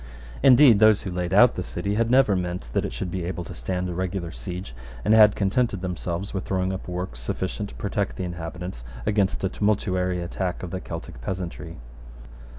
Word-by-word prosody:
Indeed 125 -4 +7
those 110 -1 +5
who 95 - -4
laid 90 0 -2
out 115 +5 +6
the - - -4
city 90 +3 -3
had 115 +2 +1
never 125 -5 +5
meant 90 -7 -3
that - - +1
it - - -3
should 90 - -4
be 90 -1 -3
able 90 0 -3
to - - -9
stand 90 +9 -3
a 90 - -3
regular 90 -1 -3
siege, 75 +5 -6 0.3
and 110 - +4
had 105 -2 +7
contented 100 0 0
themselves 90 0 -4
with 95 - -2
throwing 95 0 0
up 95 - -6
works 90 -9 -4
sufficient 95 +10 -3
to - - -12
protect 100 0 -2
the 95 - -4
inhabitants 85 -4 -6 0.2
against 100 -3 +1
a - - +3
tumultuary 95 -3 0
attack 90 +1 -3
of 90 - -5
the 95 - -4
Celtic 85 -7 -8
peasantry. 85 +1 -5
95 Hz, 195 wpm, -25 LUFS, 90-100 Hz, 0.3 s, Indeed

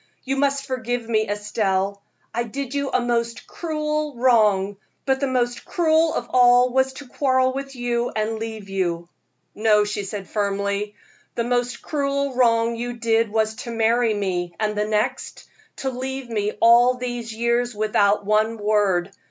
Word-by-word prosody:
You 270 +1 -1
must 275 0 0
forgive 245 -3 -3
me, 220 -2 +1
Estelle. 200 -1 -1 0.3
I 235 - 0
did 255 +3 -5
you 280 -1 -1
a - - +1
most 235 -1 -1
cruel 305 -3 -3
wrong, 210 -5 +3 0.3
but 265 -1 +1
the 275 - 0
most 245 -2 -1
cruel 320 -1 +2
of 240 - -2
all 245 0 +5
was 265 0 +2
to 280 0 -10
quarrel 260 -1 +1
with 275 0 -6
you 245 -1 -1
and 220 +1 -1
leave 220 -2 -6
you." 175 -3 -2 0.4
"No," 210 -1 +3
she 205 0 -3
said, 195 0 -6
firmly, 200 0 -2 0.4
"the 235 - 0
most 245 0 -1
cruel 280 -2 -1
wrong 230 -2 +3
you 240 +1 -4
did 230 -1 +1
was 220 0 0
to 235 - -7
marry 230 0 +2
me; 180 -4 -2
and 210 -1 0
the 210 0 0
next, 215 0 -2 0.3
to 265 - -3
leave 260 0 -5
me 210 -1 -1
all 240 +2 +6
these 245 -2 -5
years 235 +1 0
without 205 -1 +2
one 215 +2 +2
word. 205 -3 +1
235 Hz, 160 wpm, -22 LUFS, 210-255 Hz, 0.4 s, all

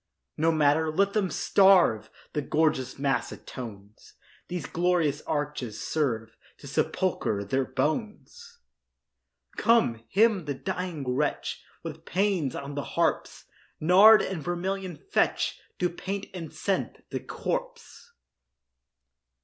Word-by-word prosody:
No 165 +1 +2
matter—let 160 +5 +2
them 205 -4 +1
starve! 190 - +4 0.2
The 150 - 0
gorgeous 150 -3 0
mass 135 -1 0
atones; 105 -4 -10 0.3
These 175 -4 -4
glorious 170 -4 +1
arches 145 -7 -3
serve 115 -8 -2 0.2
To - - -14
sepulchre 100 -2 -1
their 130 +6 0
bones. 220 - -3 1.0
Come, 220 - +3
hymn 205 -3 +3
the 145 -2 -3
dying 180 -4 -4
wretch 135 +4 -1 0.2
With 160 -1 -7
pæans 185 -8 0
on 140 +1 -6
the 145 0 -3
harps; - - 0 0.3
Nard 195 +7 +7
and 185 -5 -3
vermilion 180 +3 -3
fetch 400 - 0 0.2
To 180 - +1
paint 195 +3 -5
and 170 -4 -7
scent - - -3
the - - -2
corpse. - - -5
160 Hz, 110 wpm, -27 LUFS, 140-190 Hz, 1.0 s, Nard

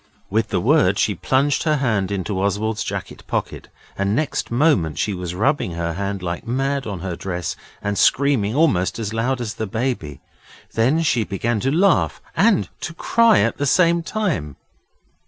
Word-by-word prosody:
With 110 +2 +1
the 90 - 0
word 110 - +3
she 105 - +2
plunged 135 +6 +1
her 155 -2 +2
hand 110 -9 0
into 95 0 -2
Oswald's 105 +2 -1
jacket - - -5
pocket, - - -3 0.3
and 100 +1 0
next 155 +4 -1
moment 120 - +2
she 105 - 0
was 90 -1 -5
rubbing 110 - 0
her 85 0 -2
hand 100 +1 -3
like 85 +6 -4
mad 135 +2 -1
on 100 -5 -5
her 90 -2 -3
dress, 90 -1 -4 0.3
and 100 0 -1
screaming 130 -6 +3
almost 120 - +2
as 110 -2 -4
loud 125 +3 0
as 115 -3 -3
the 110 - -4
Baby. 110 - -3 0.5
Then 135 +9 +2
she 125 -7 +2
began 105 +3 -1
to 135 +5 0
laugh 180 +4 +2 0.2
and 200 +2 +3
to 170 - -6
cry 230 +4 +4
at - - 0
the 145 - -1
same 170 +3 +4
time. 165 - -2
110 Hz, 175 wpm, -21 LUFS, 95-140 Hz, 0.5 s, cry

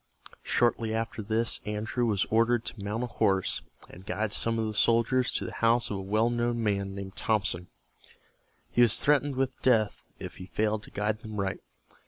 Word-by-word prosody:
Shortly 115 -2 +1
after 115 0 -3
this 110 +2 0
Andrew 110 +3 -2
was 105 -2 +1
ordered 115 +1 +3
to 105 - -7
mount 105 +4 -2
a - - 0
horse, 100 -5 0 0.3
and 90 - -13
guide 105 +3 -2
some 115 0 +2
of 110 - 0
the 110 - -3
soldiers 115 +4 +2
to - - -1
the - - -5
house 115 0 +2
of 100 - -2
a - - -4
well 110 +5 +1
known 120 0 0
man 100 -2 -1
named 100 -1 -7
Thompson. 95 -5 -1 1.0
He 120 - +3
was 120 -3 +6
threatened 145 -1 +2
with 130 0 -2
death 110 -5 +2
if - - -8
he 90 - -9
failed 110 +1 0
to - - -14
guide 105 +1 -1
them 110 -3 -7
right. 95 0 -2
110 Hz, 190 wpm, -28 LUFS, 105-120 Hz, 1.0 s, was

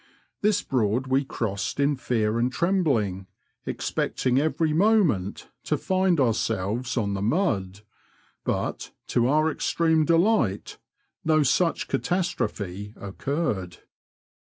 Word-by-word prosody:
This 205 -1 +2
Broad 120 0 0
we 130 +2 +2
crossed 105 -4 -3
in 140 +1 +3
fear 115 -3 0
and 125 +2 +1
trembling, 130 - 0 0.4
expecting 130 0 0
every 155 +1 +1
moment 170 - +2 0.2
to - - 0
find 185 -3 +1
ourselves 115 0 0
on 100 -4 0
the 100 - -3
mud, 100 - 0 0.6
but, - - -2 0.2
to 120 0 +2
our 155 +3 +3
extreme 160 -1 +1
delight, 165 - +1 0.4
no 155 -1 +3
such 165 +5 +1
catastrophe 105 - -2
occurred. 100 - -3
130 Hz, 110 wpm, -25 LUFS, 105-165 Hz, 0.6 s, in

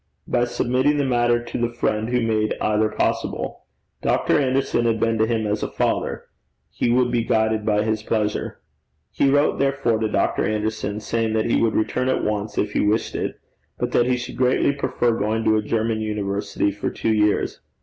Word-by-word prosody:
By 120 0 +2
submitting 130 +4 +1
the 145 - +1
matter 120 -2 +2
to - - -5
the 120 0 +1
friend 110 -2 -1
who 125 -1 +1
made 110 -1 0
either 110 0 +1
possible. - - -2 0.4
Dr. - - +2
Anderson 130 -3 +1
had 115 -1 +1
been 115 0 +1
to 110 - +3
him 110 -2 0
as 105 0 -1
a - - -1
father: - - -1 0.5
he - - -1
would 120 0 +3
be 120 -1 +1
guided 110 -1 +1
by 105 -1 +2
his 110 -1 -1
pleasure. 105 -1 -2 0.5
He 140 - +2
wrote, 145 +2 +2
therefore, 135 -5 +1
to 110 - 0
Dr. - - +1
Anderson, 105 0 -2
saying 115 0 -1
that 110 0 +1
he - - +3
would 115 -2 +1
return 125 +4 0
at - - 0
once 105 0 -2
if 105 - 0
he - - +1
wished 105 +2 +1
it, - - -3 0.4
but - - -2
that 120 - +3
he 125 -1 +1
would - - -11
greatly 130 +2 +3
prefer 140 -3 0
going 110 +1 -1
to 110 - +3
a - - +1
German 110 +1 -1
university 100 -1 -1
for 100 +1 -3
two 110 - -1
years. 105 -1 +1
110 Hz, 195 wpm, -22 LUFS, 110-120 Hz, 0.5 s, to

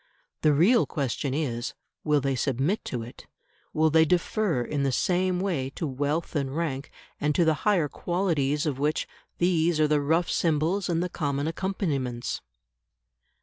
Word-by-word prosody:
The 155 - +4
real 190 - +4
question 140 -2 -2
is, 125 -6 -2 0.3
Will 150 -1 +3
they 135 0 0
submit 135 - 0
to 120 -3 -3
it, 120 - -12 0.4
will 155 0 +2
they 160 +1 +6
defer 180 - +1
in 145 +3 -2
the 135 -1 +1
same 180 +6 +1
way 170 -9 -1
to - - -3
wealth 145 +5 -2
and 140 0 -1
rank, 145 -5 -2 0.3
and 150 0 0
to 170 - +4
the 160 - +4 0.2
higher 175 -7 +3
qualities 155 -4 0
of 140 -4 -2
which 150 +2 0 0.3
these 170 -2 +2
are 155 - +4
the 150 -1 +2
rough 165 +5 +2
symbols 165 +4 +1
and 170 0 +1
the 180 - -2
common 145 -4 -2
accompaniments? 150 - -2
155 Hz, 160 wpm, -27 LUFS, 140-175 Hz, 0.4 s, they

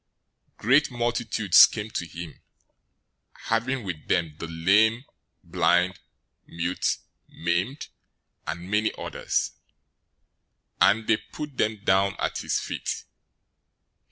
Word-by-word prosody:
015:030 - - -47
Great 135 +7 +3
multitudes 120 -5 +4
came 110 0 -6
to 85 - -3
him, 85 -1 -9 1.0
having 120 +3 -1
with 90 -6 -6
them 80 -3 0
the 85 - -5
lame, 105 +9 +3 0.4
blind, 90 +3 +2 0.5
mute, 85 +2 -1 0.3
maimed, 90 - -2 0.6
and 85 +4 -5
many 105 +1 +2
others, - - -2 1.3
and 110 +3 +4
they 110 -1 +3
put 150 +3 -8
them 110 -1 0
down 95 +1 +2
at - - -2
his - - -1
feet. - - -4
100 Hz, 105 wpm, -26 LUFS, 85-115 Hz, 1.3 s, multitudes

